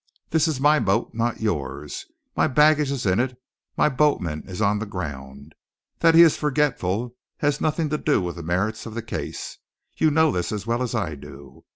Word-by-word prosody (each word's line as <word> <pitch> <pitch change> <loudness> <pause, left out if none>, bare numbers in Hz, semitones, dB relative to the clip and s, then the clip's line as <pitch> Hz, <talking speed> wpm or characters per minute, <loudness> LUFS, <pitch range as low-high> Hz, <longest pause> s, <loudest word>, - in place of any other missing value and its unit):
"This 160 0 +3
is 155 -5 -1
my 150 +2 +4
boat, 100 +1 0
not 115 0 -2
yours; 75 -8 -3 0.3
my - - +3
baggage 150 0 +4
is 140 -5 -3
in 95 +1 +2
it, 125 0 -1 0.4
my - - +4
boatman 130 - +1
is 95 - -6
on 105 -1 +2
the 110 - -4
ground. 70 -5 -7 0.5
That 165 -1 +5
he 170 - +10
is 165 - +5
forgetful 125 - -1 0.2
has 145 -1 0
nothing 155 0 0
to 150 +1 -1
do 150 - +2
with 90 -2 -4
the - - -6
merits 95 +8 -2
of 110 - -8
the 115 - -4
case. 110 - -6 0.4
You 160 - +3
know 160 +1 +3
this 90 - -2
as 105 -2 -4
well 120 +2 -1
as 125 -1 -2
I 100 -9 -1
do. 70 -1 -13
115 Hz, 200 wpm, -23 LUFS, 90-150 Hz, 0.5 s, he